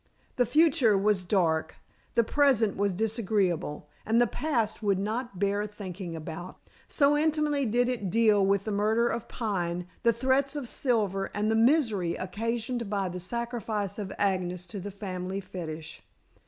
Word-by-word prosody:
The 245 -2 +3
future 270 -6 +4
was 200 -1 +2
dark, 175 -4 +1 0.4
the 235 - +5
present 240 -5 +3
was 200 0 +1
disagreeable, 195 -7 -1 0.2
and 225 +2 +2
the 240 - +5
past 235 -4 -1
would 200 -3 +2
not 215 +2 -3
bear 200 +2 0
thinking 190 -4 -7
about, 165 +3 -7 0.3
so 285 -1 +3
intimately 300 -3 +1
did 245 +3 +2
it 235 -7 -2
deal 215 -1 +4
with 195 0 +2
the 215 - -3
murder 215 +3 +2
of 235 -1 -3
Pine, 180 -6 -2 0.2
the 235 - +4
threats 265 +4 +1
of 285 -4 -4
Silver, 210 -7 0
and 210 +1 +1
the - - +2
misery 225 - +3
occasioned 230 +4 -3
by 200 -2 -1
the 180 +1 -5
sacrifice 220 0 -3
of 200 -2 -4
Agnes 180 -2 0
to 200 +2 -7
the 200 +2 -5
family 190 -1 -4
fetish. 160 -4 -7
210 Hz, 155 wpm, -28 LUFS, 190-235 Hz, 0.4 s, the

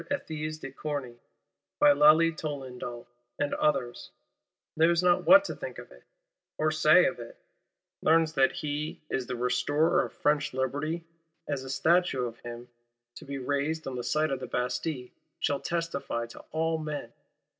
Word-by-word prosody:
Ethys 155 - -3
de 145 - -8
Corny, 135 -4 -5 0.6
by 145 - +6
Lally 155 +3 +6
Tollendal, 130 -6 -6 0.3
and 145 - -1
others; 120 - 0 0.7
knows 170 +2 +3
not 175 -1 +3
what 290 +1 +9
to - - -3
think - - -7
of - - -11
it, - - -17 0.5
or 155 0 +1
say 155 +3 +5
of 130 - -1
it; 115 0 -10 0.6
learns 160 0 +3
that 135 -2 +4
he 150 +1 -4
is 130 -1 -2
"Restorer 125 +6 +2
of - - -6
French 150 -3 0
Liberty,"—as 160 +2 -4
a 130 - -8
Statue 135 -1 +2
of 115 -1 -7
him, 120 0 -8 0.5
to - - -11
be 140 0 -5
raised 145 +4 -2
on 135 - -4
the 125 - -4
site 155 +3 +1
of 135 - -1
the 130 - -6
Bastille, 125 +2 -2 0.3
shall 140 -1 0
testify 165 -8 -3
to 115 - -12
all 160 0 0
men. 150 -1 -5
145 Hz, 155 wpm, -28 LUFS, 130-160 Hz, 0.7 s, what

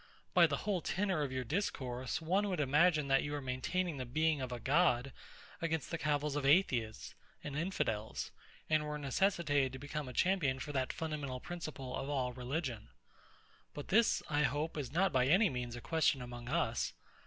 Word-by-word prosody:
By - - +7
the - - -1
whole 200 -4 -1
tenor 190 -1 0
of 140 -3 -1
your 130 0 -2
discourse, 130 - -2
one 195 +5 +1
would 180 -4 -1
imagine 150 +2 +3
that 135 0 +5
you 145 - -3
were 145 - -1
maintaining 140 +6 -2
the 130 - -3
Being 155 +3 +1
of 130 -1 -4
a 120 - -4
God, 135 -1 +2 0.5
against 160 -2 -1
the 165 - -1
cavils 150 -1 0
of 145 - -1
Atheists 135 - +2 0.3
and 145 -1 -5
Infidels; 115 - -2 0.4
and 155 -1 +2
were 150 0 -3
necessitated 145 -3 +1
to - - -5
become 145 +1 -5
a - - -8
champion 170 -5 +2
for 140 +3 -5
that 130 -2 0
fundamental 150 -5 -4
principle 155 -5 -6
of 135 - -4
all 130 -3 -1
religion. 125 - -4 0.9
But 145 - -7
this, 225 +3 +4
I 145 -1 +1
hope, 150 +4 0
is 140 -5 -4
not 185 +5 +2
by 130 -1 +3
any 190 +6 +5
means 120 -2 -4
a 120 - -7
question 160 -2 +2
among 120 0 -8
us. 145 -7 0
145 Hz, 185 wpm, -35 LUFS, 130-165 Hz, 0.9 s, By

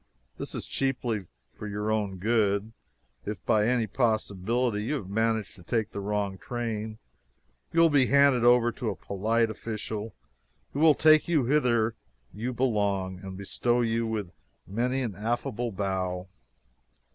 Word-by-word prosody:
This - - -5
is - - -4
chiefly 120 -7 -1 0.3
for 105 - -7
your 105 +1 -2
own 105 -3 -1
good. 105 +1 +1 0.5
If 105 -4 -6
by 105 0 +3
any 120 -2 +2
possibility 110 0 0
you 150 - 0
have 105 -10 -5
managed 110 0 0
to 90 - -14
take 110 +3 -1
the - - -5
wrong 100 -1 -2
train, 110 -3 -4 0.7
you 165 - +4
will 165 -1 +6
be 135 -3 +4
handed 140 -3 +5
over 120 -1 +5
to 115 0 -3
a 100 - -3
polite 110 +6 0
official 110 0 -5 0.6
who 140 - -3
will 155 -1 +6
take 155 -1 +5
you 160 -5 +3
whither 120 -4 +2 0.4
you 115 +6 -3
belong 100 -7 0
and 95 -1 -8
bestow 120 +5 0
you 115 0 0
with 105 -5 -3 0.3
many 125 +6 -1
an 115 -5 -3
affable 120 +2 -2
bow. 95 -2 -2
110 Hz, 150 wpm, -28 LUFS, 100-120 Hz, 0.7 s, will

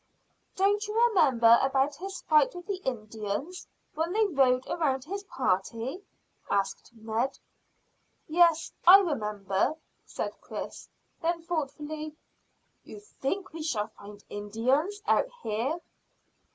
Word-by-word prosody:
"Don't 410 +2 +2
you 425 +2 -1
remember 245 - +5
about 270 +1 +2
his 385 +2 -6
fight 305 +1 +4
with 355 0 -8
the 395 -1 -2
Indians, 225 - -4 0.3
when 320 +3 -1
they 435 +1 +3
rode 265 -8 +3
round 270 -6 0
his 400 +5 -5
party?" 235 - -2 0.5
asked 200 -1 -1
Ned. 225 +4 -2 0.9
"Yes, 335 0 +4 0.2
I 370 +2 +12
remember," 210 - -1 0.3
said - - -4
Chris. - - -7 0.3
Then 335 0 -1
thoughtfully, 305 -1 -4 0.7
"You - - -10
think 385 -3 -4
we 325 - -6
shall 225 -9 -1
find 205 -1 -13
Indians 255 - -1
out - - +3 0.2
here?" 230 +9 -1
295 Hz, 115 wpm, -28 LUFS, 230-350 Hz, 0.9 s, I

